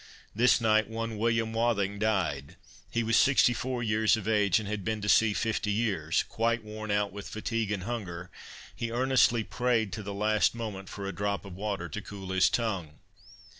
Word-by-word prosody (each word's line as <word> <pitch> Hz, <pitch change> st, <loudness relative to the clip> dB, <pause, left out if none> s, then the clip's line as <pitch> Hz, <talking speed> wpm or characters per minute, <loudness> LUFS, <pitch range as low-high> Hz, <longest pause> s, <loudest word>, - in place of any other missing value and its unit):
This 120 Hz, +4 st, +4 dB
night 110 Hz, -2 st, +3 dB
one 115 Hz, 0 st, -4 dB
William 115 Hz, 0 st, +1 dB
Wathing 100 Hz, -4 st, 0 dB
died; 90 Hz, -8 st, -1 dB, 0.3 s
he 115 Hz, -, 0 dB
was 115 Hz, 0 st, +1 dB
64 125 Hz, -2 st, +3 dB
years 110 Hz, +1 st, +3 dB
of 110 Hz, -2 st, -6 dB
age, 105 Hz, -4 st, +3 dB
and 105 Hz, -, -6 dB
had 105 Hz, -1 st, -3 dB
been 110 Hz, +1 st, -2 dB
to 105 Hz, -, -3 dB
sea 105 Hz, 0 st, +4 dB
50 110 Hz, -2 st, -1 dB
years; 100 Hz, -8 st, 0 dB
quite 115 Hz, 0 st, 0 dB
worn 110 Hz, 0 st, -7 dB
out 105 Hz, 0 st, +1 dB
with 100 Hz, 0 st, -7 dB
fatigue 110 Hz, -1 st, -2 dB
and 100 Hz, -3 st, -2 dB
hunger, 90 Hz, -6 st, -5 dB, 0.4 s
he 115 Hz, -, -3 dB
earnestly 120 Hz, -1 st, +3 dB
prayed, 115 Hz, -4 st, 0 dB
to 110 Hz, -, -4 dB
the 100 Hz, 0 st, -6 dB
last 105 Hz, +3 st, +2 dB
moment, 105 Hz, -5 st, -6 dB
for 100 Hz, -, -6 dB
a 100 Hz, -, -4 dB
drop 100 Hz, 0 st, -2 dB
of 95 Hz, -3 st, -9 dB
water 100 Hz, -3 st, -3 dB
to 105 Hz, -, -6 dB
cool 95 Hz, -2 st, -8 dB
his 95 Hz, -1 st, +4 dB
tongue. 95 Hz, -10 st, -2 dB
110 Hz, 185 wpm, -29 LUFS, 100-115 Hz, 0.4 s, This